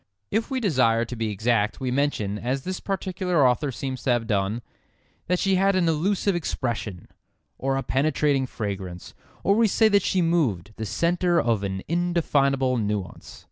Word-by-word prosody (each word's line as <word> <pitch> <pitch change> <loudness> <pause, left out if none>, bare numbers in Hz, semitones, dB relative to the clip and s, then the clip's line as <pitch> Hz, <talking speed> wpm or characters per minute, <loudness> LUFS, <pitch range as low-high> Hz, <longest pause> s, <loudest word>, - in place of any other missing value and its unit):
If 220 +2 0
we 265 -2 -1
desire 125 - +2
to 125 - -6
be 115 -1 -2
exact 105 +1 0
we 130 -2 -2
mention, 125 -7 0
as 130 +4 -2
this 185 0 -4
particular 180 -6 0
author 130 +3 +1
seems 130 +1 -5
to - - -2
have 120 -2 +2
done, 105 +1 -1 0.6
that 180 - +2
she 195 0 +2
had 195 +1 +3
an 180 -2 +2
"elusive 190 +5 +1
expression," 115 - -3 0.5
or 135 0 0
a 135 - -2
penetrating 140 -1 +1
fragrance. 95 -6 -6 0.3
Or 200 - +4
we 225 +2 +4
say 220 +2 +4
that 200 -1 +4
she 185 -1 +1
moved, 120 - 0
the 110 - -4
centre 175 - +1
of 115 -3 +1
an 95 -1 -3
indefinable 140 -7 +1
nuance. 105 -3 -4
135 Hz, 170 wpm, -25 LUFS, 110-175 Hz, 0.6 s, Or